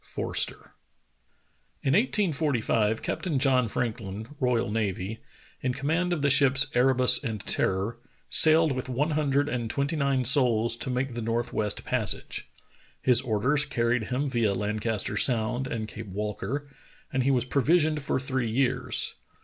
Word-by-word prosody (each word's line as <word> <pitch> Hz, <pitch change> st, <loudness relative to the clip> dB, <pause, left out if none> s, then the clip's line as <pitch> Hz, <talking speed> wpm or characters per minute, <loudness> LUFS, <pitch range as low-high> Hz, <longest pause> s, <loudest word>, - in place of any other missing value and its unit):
— -, -, -36 dB
Forster. -, -, -2 dB, 1.1 s
IN 135 Hz, -, +2 dB
1845 145 Hz, -, +1 dB
Captain 170 Hz, -7 st, -2 dB
John 130 Hz, -2 st, +3 dB
Franklin, 110 Hz, -1 st, -4 dB
royal 125 Hz, -6 st, +1 dB
navy, 105 Hz, 0 st, -2 dB, 0.4 s
in 125 Hz, -1 st, -1 dB
com 135 Hz, -, -7 dB
mand 175 Hz, +4 st, +1 dB
of 165 Hz, -5 st, -1 dB
the 140 Hz, -, +4 dB
ships 135 Hz, -1 st, +4 dB
Erebus 130 Hz, +2 st, +3 dB
and 110 Hz, -6 st, -4 dB
Terror, 100 Hz, +5 st, 0 dB, 0.3 s
sailed 160 Hz, 0 st, +5 dB
with 130 Hz, 0 st, -4 dB
one 145 Hz, +6 st, 0 dB
hundred 145 Hz, -1 st, +1 dB
and 120 Hz, -5 st, -3 dB
twenty 140 Hz, +6 st, -1 dB
nine 140 Hz, -3 st, +1 dB
souls 120 Hz, -3 st, +3 dB
to 130 Hz, -, -4 dB
make 125 Hz, 0 st, -2 dB
the 120 Hz, -, -4 dB
northwest 115 Hz, -2 st, -2 dB
passage. -, -, -1 dB, 0.5 s
His 125 Hz, -2 st, +4 dB
orders 130 Hz, +5 st, +2 dB
carried 120 Hz, -4 st, 0 dB
him 130 Hz, +4 st, -2 dB
via 115 Hz, -6 st, +1 dB
Lan 105 Hz, +2 st, -2 dB
caster 105 Hz, -2 st, -1 dB
Sound 120 Hz, +2 st, 0 dB
and 115 Hz, -4 st, -4 dB
Cape 110 Hz, 0 st, -8 dB
Walker, 105 Hz, +8 st, -4 dB, 0.5 s
and 130 Hz, -, +1 dB
he 130 Hz, -, +1 dB
was 125 Hz, -3 st, +2 dB
provisioned 155 Hz, +3 st, +2 dB
for 135 Hz, -, -1 dB
three 130 Hz, -3 st, -2 dB
years. 125 Hz, +3 st, -1 dB
125 Hz, 150 wpm, -27 LUFS, 115-140 Hz, 1.1 s, sailed